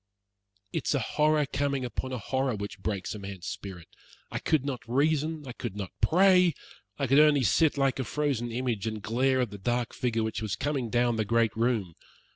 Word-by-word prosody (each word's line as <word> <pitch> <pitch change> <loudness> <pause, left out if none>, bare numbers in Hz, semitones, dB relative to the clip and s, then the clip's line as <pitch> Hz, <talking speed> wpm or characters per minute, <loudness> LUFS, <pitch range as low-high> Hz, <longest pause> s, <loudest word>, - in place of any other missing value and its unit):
It - - -2
is - - +2
a - - +2
horror 150 0 +2
coming 140 0 -1
upon 130 +1 -4
a 130 - -2
horror 130 +2 -1
which 100 0 -6
breaks 100 -1 -3
a 105 - -7
man's 95 -3 -8
spirit. 95 -4 -7 0.4
I - - -2
could 150 -4 +1
not 135 -4 -3
reason, 150 +4 +1
I - - -5
could 120 -4 -6
not 100 -3 -5
pray; 180 -2 +5 0.4
I 140 - 0
could 135 +3 +5
only 150 -3 +5
sit 155 +5 +3
like 135 -1 +1
a - - 0
frozen 130 -2 -1
image, 115 -3 -2
and 110 -2 -4
glare 130 +3 +2
at 120 -5 -2
the 100 - -8
dark 120 +4 -1
figure 115 -3 -1
which 110 0 -3
was 110 -3 -2
coming 140 -5 -2
down 120 0 +2
the 110 - +1
great 115 0 +1
room. 110 -6 0
125 Hz, 205 wpm, -28 LUFS, 110-140 Hz, 0.4 s, pray